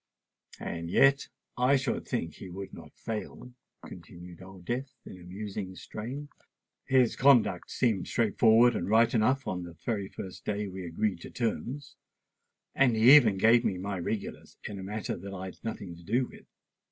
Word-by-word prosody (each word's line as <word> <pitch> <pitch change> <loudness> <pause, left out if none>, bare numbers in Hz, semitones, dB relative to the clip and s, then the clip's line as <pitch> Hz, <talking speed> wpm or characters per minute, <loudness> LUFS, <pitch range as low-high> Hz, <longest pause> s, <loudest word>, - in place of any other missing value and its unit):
"And 85 0 -5
yet 135 +8 +4 0.3
I 130 +3 +4
should 135 - -2
think 80 -2 -2
he 95 - -10
would 95 +2 -8
not - - -12
fail," 115 +2 -6 0.3
continued 85 0 -11
Old 95 -1 -13
Death 130 +5 -3
in 90 - -10
a - - -13
musing 95 +1 -6
strain. 130 +11 -7 0.6
"His 130 -3 +3
conduct 125 -9 +4
seemed 110 -7 0
straight 110 -3 -1
forward 115 +1 +6
and - - -2
right 115 +2 +4
enough 130 +4 +2
the 90 -4 -5
very 105 -5 -1
first 95 - -9
day 105 0 -2
we 95 -1 -7
agreed 95 +1 -1
to - - -9
terms; 125 +3 -4 0.8
and 125 -4 +3
he 120 +6 +8
even 110 -9 +5
gave 115 +4 +5
me 95 - 0
my 100 +1 -4
regulars 100 +4 -5
in 100 - -6
a - - -6
matter 105 +3 -4
that 100 +2 -8
I'd 95 0 -8
nothing 100 -6 -5
to 85 - -15
do 120 +8 +1
with. - - -15
105 Hz, 170 wpm, -29 LUFS, 95-120 Hz, 0.8 s, he